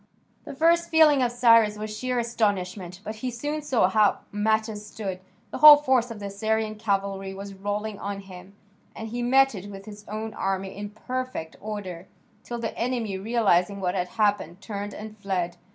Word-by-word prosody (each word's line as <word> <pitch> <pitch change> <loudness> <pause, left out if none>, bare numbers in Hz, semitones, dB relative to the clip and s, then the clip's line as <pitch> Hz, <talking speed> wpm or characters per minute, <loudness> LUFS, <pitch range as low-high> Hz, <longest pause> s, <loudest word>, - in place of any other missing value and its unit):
The - - -8
first 335 +3 +3
feeling 310 -4 +5
of 245 -1 +1
Cyrus 230 -3 +5
was 215 0 -5
sheer 250 +2 -2
astonishment, 195 -6 -1
but 215 +1 -6
he 255 +3 -3
soon 290 +6 -3
saw 260 -10 +2
how 210 +2 +3
matters 215 0 0
stood. 205 -3 -6 0.3
The - - -5
whole 300 -1 +11
force 260 -4 +1
of 225 -2 -7
the 200 - -6
Assyrian 215 +2 -1
cavalry 195 -2 -2
was 200 0 -8
rolling 205 +2 -4
on 200 0 -4
him, 190 0 -13 0.4
and 220 0 -6
he 240 +2 -4
met 270 +2 +4
it 200 0 -7
with 195 -1 -10
his 210 -1 -11
own 215 +1 -5
army 195 -1 -3
in 205 +1 -6
perfect 250 -5 -5
order, 195 -4 -6 0.4
till 240 - -5
the 230 -1 -4
enemy, 235 -4 -2
realising 200 -3 +2
what 180 -2 -1
had 180 -2 -1
happened, 205 -5 0
turned 205 0 -6
and 215 0 -8
fled. 180 -3 -2
210 Hz, 180 wpm, -25 LUFS, 195-235 Hz, 0.4 s, whole